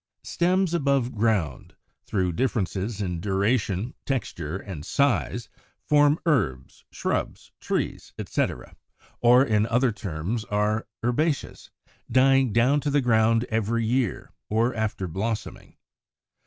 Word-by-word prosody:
89. - - -8
=Stems 180 0 +2
above 140 -6 +1
ground=, 105 - -1 0.3
through 95 -4 0
differences 105 -1 -1
in 90 -3 -3
duration, 100 +2 0
texture, 95 - -3
and 95 -7 -8
size, 120 - 0 0.4
form 145 0 +4
herbs, 65 - 0
shrubs, - - -3
trees, - - -3
etc., 60 - -3 0.4
or 125 +2 +6
in 110 -3 +2
other 120 +2 +2
terms 100 +2 -4
are 105 +2 0 0.2
Herbaceous, 145 +5 -1 0.4
dying 135 -1 +4
down 125 +7 +3
to 145 - -2
the 145 0 +2
ground 115 -1 +3
every 115 +1 0
year, 120 -2 -1 0.2
or 115 +4 +1
after 110 -4 -2
blossoming. 105 +6 -4
115 Hz, 115 wpm, -25 LUFS, 100-130 Hz, 0.4 s, or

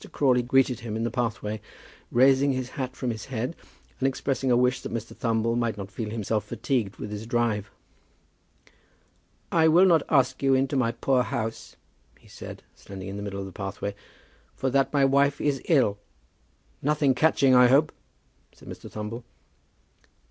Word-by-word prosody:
Crawley 130 -3 +3
greeted 125 0 +2
him 110 -2 -5
in 110 - -2
the 115 - -1
pathway, 110 -3 -3 0.5
raising 135 +2 +4
his 130 -1 -3
hat 130 -2 -5
from 125 -2 -2
his 110 -2 -6
head, 130 +4 -4 0.4
and 135 - +2
expressing 135 0 -1
a 120 - +4
wish 125 +1 +2
that - - -7
Mr. 115 -1 -5
Thumble 115 -1 0
might 115 -3 -1
not 100 -1 -7
feel 110 +1 -5
himself 110 -1 -2
fatigued 120 -3 -2
with 105 - -7
his 105 +1 -6
drive. 115 -4 0 1.8
"I 160 -1 +4
will 170 +4 +6
not 170 -4 +5
ask 130 -3 +2
you 135 -1 +3
into 135 +1 0
my 120 -3 +2
poor 125 +2 +1
house," 115 -2 -4 0.4
he - - -21
said, - - -10
standing 95 -1 -9
in 100 - -6
the - - -5
middle 100 -1 -5
of - - -5
the 95 - -9
pathway; 100 +2 -5 0.6
"for 130 - -1
that 135 +1 +2
my 140 -2 +3
wife 140 +1 +3
is 140 -3 0
ill." 130 -11 +2 0.8
"Nothing 145 -1 +2
catching, 135 -1 +3
I 125 0 +7
hope?" 140 +5 +4 0.6
said - - -17
Mr. - - -9
Thumble. 110 +3 -6
125 Hz, 170 wpm, -26 LUFS, 110-135 Hz, 1.8 s, I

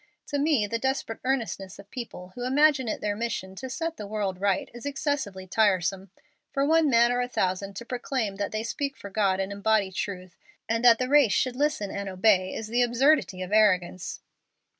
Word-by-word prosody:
To 285 - -1
me, 285 -7 +2
the 230 +3 -2
desperate 265 -3 -2
earnestness 225 -7 -2
of 200 0 -14
people 230 -8 -7
who 245 - -6
imagine 270 0 +3
it 215 - -3
their 205 -1 -1
mission 210 -4 -3
to 260 - -6
set 330 +4 -3
the 210 - -6
world 200 -3 -3
right 200 -1 +1
is 240 - -10
excessively 275 -9 -2
tiresome. 190 -1 +1 0.4
For 275 0 +1
one 320 0 +4
man 235 -1 +5
or 245 0 +1
a 245 - -1
thousand 195 -3 -2
to 235 - -7
proclaim 245 -4 -3
that 200 0 -2
they 215 0 -2
speak 275 +4 -3
for 200 - -9
God 195 -2 +1
and 195 +1 -2
embody 200 -1 +1
truth, 185 -2 -5 0.3
and 230 +1 0
that 235 -2 +7
the 255 - -1
race 275 -7 +5
should 255 +2 +1
listen 280 -8 0
and 200 -1 -4
obey, 185 0 +3
is 225 - -5
the 240 +3 +1
absurdity 240 -5 +2
of 185 - -8
arrogance." 185 -5 +2
220 Hz, 200 wpm, -27 LUFS, 195-260 Hz, 0.4 s, that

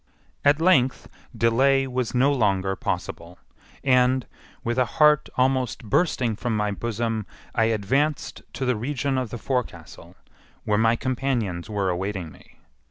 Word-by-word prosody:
At 145 +1 +4
length 150 -7 +3 0.3
delay 135 +4 +3
was 125 -2 -3
no 135 +3 +4
longer 95 -6 +1
possible, 85 -1 -4 0.5
and, 130 -1 +3 0.4
with 120 +2 -1
a 125 - +4
heart 150 -1 +5
almost 130 -2 +1
bursting 120 - +1
from 115 0 -2
my 105 0 0
bosom, 115 0 -3 0.3
I 115 - +2
advanced 130 +8 0
to 135 - -3
the 125 -1 +1
region 135 +3 -1
of 125 -3 -3
the 120 - -5
forecastle, 115 - -5 0.5
where 105 0 +1
my 115 +1 +4
companions 120 -9 -2
were 100 -3 0
awaiting 95 -2 -3
me. - - -19
120 Hz, 140 wpm, -24 LUFS, 105-130 Hz, 0.5 s, heart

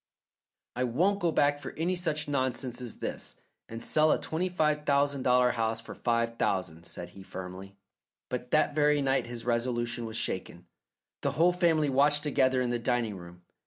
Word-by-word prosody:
"I 125 - 0
won't 175 +12 +1
go 170 -4 +1
back 145 -1 +2
for - - -7
any 175 +4 -1
such 155 -4 -2
nonsense 130 -3 -1
as 120 -3 -7
this, - - -5 0.3
and 115 0 -7
sell 155 0 +3
a - - +2
twenty 175 +4 -2
five 150 -4 +1
thousand 140 -1 +2
dollar 125 -1 +4
house 115 -1 -1
for 115 - -9
five 115 -1 -1
thousand," 85 -3 -1
said 90 0 -8
he 95 - -12
firmly. 95 +1 -8 0.5
But 125 0 -4
that 155 +1 +2
very 150 -1 +3
night 135 -2 +1
his 120 -1 -7
resolution 120 0 -1
was 110 0 -4
shaken. 90 -1 -3 0.6
The - - 0
whole 175 +3 +4
family 160 -5 +2
watched 145 +2 +4
together 130 -3 +2
in 120 - -1
the 120 - 0
dining 120 -3 0
room. 90 -1 -12
125 Hz, 180 wpm, -29 LUFS, 115-150 Hz, 0.6 s, dollar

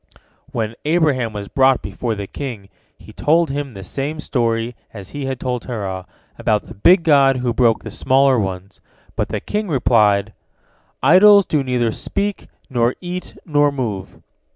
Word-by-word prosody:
When 115 -4 -2
Abraham 150 -7 +1
was 105 -1 -6
brought 135 0 +3
before 110 +3 -3
the 100 -1 -5
king, 110 -4 -7 0.3
he - - -15
told 165 0 +2
him 140 -2 -4
the 95 -2 -9
same 145 +10 -4
story 115 -4 -1 0.2
as 100 -3 -9
he 145 -2 -5
had 130 -1 -3
told 125 -1 -2
Terah, 95 -6 -5 0.3
about 105 -1 0
the - - -11
big 170 - +4
god 140 -4 +4
who 125 -1 -1
broke 115 -2 +2
the - - -7
smaller 135 -1 +3
ones, 95 -1 -5 0.3
but - - -2
the - - -2
king 210 0 -3
replied, 110 - +2 0.7
"Idols 200 +7 +7
do 150 -3 0
neither 125 -3 0
speak, 200 - -3 0.2
nor 120 -3 +1
eat, 180 0 -7
nor 145 -2 +2
move." 110 -9 -4
125 Hz, 160 wpm, -19 LUFS, 110-145 Hz, 0.7 s, Idols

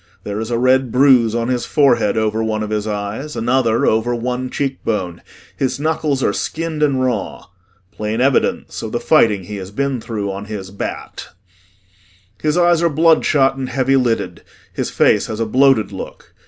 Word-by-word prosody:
There 105 0 -4
is 110 +1 -4
a 120 - 0
red 130 0 +2
bruise 125 -3 +4
on 120 +1 -1
his 125 -2 -1
forehead 120 -8 +2
over 110 0 0
one 110 -1 -1
of 105 - -5
his 105 0 -2
eyes, 105 +8 -4
another 120 -1 +1
over 110 +2 +1
one 125 +2 -3
cheekbone, 110 -11 -3 0.3
his 130 -1 -2
knuckles 150 -3 -1
are 100 - +1
skinned 160 +3 -3
and 140 -3 +2
raw 120 -6 -3 0.5
plain 105 +1 -3
evidence 135 +1 0
of - - -6
the - - 0
fighting 105 -4 +3
he 105 +3 -7
has 95 -1 -7
been 135 +3 -2
through 105 -4 -4
on 100 +1 -6
his 100 -3 -7
"bat." 100 - -6 1.1
His 155 +2 0
eyes 175 -1 +3
are 170 - +3
bloodshot 155 -3 +3
and 130 -1 -4
heavy 135 +1 +1
lidded, 125 -4 0 0.3
his - - -3
face - - +2
has 110 0 -5
a 115 - 0
bloated 130 0 +3
look. - - -9
120 Hz, 175 wpm, -18 LUFS, 110-135 Hz, 1.1 s, bruise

